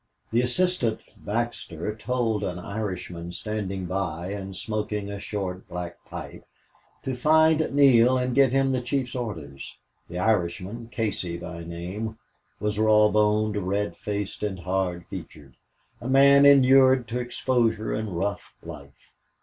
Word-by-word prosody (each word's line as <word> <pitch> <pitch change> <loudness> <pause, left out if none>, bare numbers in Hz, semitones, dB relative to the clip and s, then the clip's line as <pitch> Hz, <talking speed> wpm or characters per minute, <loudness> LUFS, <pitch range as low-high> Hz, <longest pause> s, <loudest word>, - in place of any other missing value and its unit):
The 115 +2 +3
assistant, 125 -2 +1 0.2
Baxter, 105 -4 -3
told 115 -1 -1
an 90 -1 -3
Irishman 90 -3 -5
standing 100 -1 -4
by 90 -2 -3
and 95 -2 -6
smoking 105 -1 -3
a 100 - -5
short, 95 -2 -5
black 90 -1 -7
pipe - - -8 0.6
to 130 - -2
find 160 +3 +4
Neale 130 -3 +5
and 125 0 -1
give 135 -1 +5
him 135 0 +2
the 130 -1 0
chief's 125 0 -2
orders. 80 - -6 0.3
The 90 - -6
Irishman, 100 +3 -1
Casey 95 -7 -2
by 85 0 -7
name, 90 +7 -5 0.4
was 105 0 -2
raw 105 -1 +5
boned, 105 0 +2
red 100 -2 -1
faced, 105 +1 -4
and 100 -4 -3
hard 90 -1 -2
featured, 70 -3 -10 0.5
a 120 - -5
man 140 +1 +7
inured 130 -2 +6
to 120 +2 -2
exposure 120 -3 0
and 105 -5 -3
rough 100 +3 -3
life. 75 -4 -10
105 Hz, 135 wpm, -25 LUFS, 90-125 Hz, 0.6 s, man